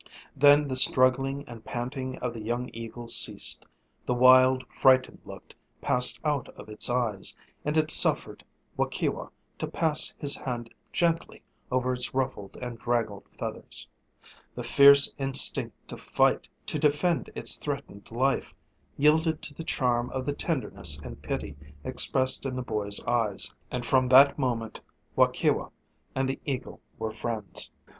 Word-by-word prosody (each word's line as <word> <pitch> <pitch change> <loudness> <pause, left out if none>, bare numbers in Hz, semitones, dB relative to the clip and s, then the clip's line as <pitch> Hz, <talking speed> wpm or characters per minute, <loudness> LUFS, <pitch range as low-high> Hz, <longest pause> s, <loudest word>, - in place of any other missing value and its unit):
Then 145 +1 +5
the 130 - -3
struggling 135 +2 +3
and 115 -2 -11
panting 130 +2 -5
of 125 -2 -4
the 115 - -8
young 120 +3 -4
eagle 115 +1 -8
ceased; - - -2 0.4
the 125 - 0
wild, 130 +1 +5
frightened 130 -1 +2
look - - -12 0.3
passed 125 0 +5
out 145 -4 -1
of - - -12
its 105 +3 0
eyes, 120 -5 -1 0.3
and 150 +1 -2
it 155 0 +4
suffered - - +4 0.3
Waukewa - - -2 0.3
to - - -3
pass 160 -1 +1
his 145 -2 +2
hand 120 -3 -6 0.2
gently 165 -1 -1 0.3
over 130 0 0
its 125 0 -3
ruffled 115 -7 -3
and 120 -2 -7
draggled 115 -4 -2
feathers. - - -7 0.7
The - - -6
fierce 140 0 +6
instinct 135 0 +3
to - - -8
fight, - - 0 0.2
to - - -3
defend 150 +3 0
its - - 0
threatened 140 -8 -7
life, 130 +4 -1 0.4
yielded 155 +2 +2
to 145 - -7
the 165 - -8
charm 125 -5 -1
of 130 -1 -5
the 145 - -2
tenderness 150 -2 0
and - - -11
pity - - -5 0.3
expressed 130 +1 +2
in 130 - -5
the 130 - -4
boy's 105 -3 -3
eyes; 115 -4 -1 0.2
and 125 -1 -4
from 130 0 +2
that 140 +3 +6
moment 115 -4 -3 0.3
Waukewa - - +1 0.5
and 135 0 0
the 135 - -4
eagle 135 -3 -5 0.2
were 110 -1 -4
friends. 110 -2 -4
130 Hz, 145 wpm, -27 LUFS, 120-140 Hz, 0.7 s, fierce